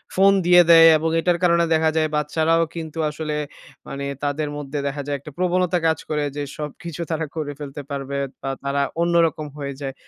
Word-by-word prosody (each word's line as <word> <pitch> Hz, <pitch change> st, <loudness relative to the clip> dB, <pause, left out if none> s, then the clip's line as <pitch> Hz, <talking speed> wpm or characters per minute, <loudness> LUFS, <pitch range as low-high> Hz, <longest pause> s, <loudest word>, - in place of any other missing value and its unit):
Phone 195 Hz, +1 st, +5 dB
দিয়ে 175 Hz, 0 st, +7 dB
দেয়। 165 Hz, 0 st, +9 dB
এবং 160 Hz, +1 st, -1 dB
এটার 175 Hz, +1 st, +1 dB
কারণে 170 Hz, -1 st, +4 dB
দেখা 160 Hz, 0 st, +3 dB
যায় 155 Hz, 0 st, +2 dB
বাচ্চারাও 160 Hz, +2 st, +1 dB
কিন্তু 160 Hz, -1 st, -6 dB
আসলে 150 Hz, 0 st, -4 dB, 0.5 s
মানে 140 Hz, 0 st, -5 dB, 0.2 s
তাদের 145 Hz, +1 st, -1 dB
মধ্যে 145 Hz, 0 st, -5 dB
দেখা 140 Hz, +1 st, -3 dB
যায় 145 Hz, -1 st, -1 dB
একটা 145 Hz, +3 st, -11 dB
প্রবণতা 180 Hz, 0 st, +1 dB
কাজ 160 Hz, -, +2 dB
করে 150 Hz, -1 st, 0 dB
যে 145 Hz, -, -3 dB, 0.2 s
সবকিছু 155 Hz, +3 st, -6 dB
তারা 160 Hz, 0 st, -1 dB
করে 155 Hz, -2 st, -3 dB
ফেলতে 145 Hz, 0 st, -7 dB
পারবে 140 Hz, 0 st, -4 dB, 0.2 s
বা 135 Hz, -, -3 dB
তারা 140 Hz, 0 st, 0 dB, 0.2 s
অন্যরকম 170 Hz, -3 st, +2 dB
হয়ে 140 Hz, -1 st, -4 dB
যায়। 135 Hz, -1 st, -4 dB
155 Hz, 185 wpm, -22 LUFS, 145-165 Hz, 0.5 s, দেয়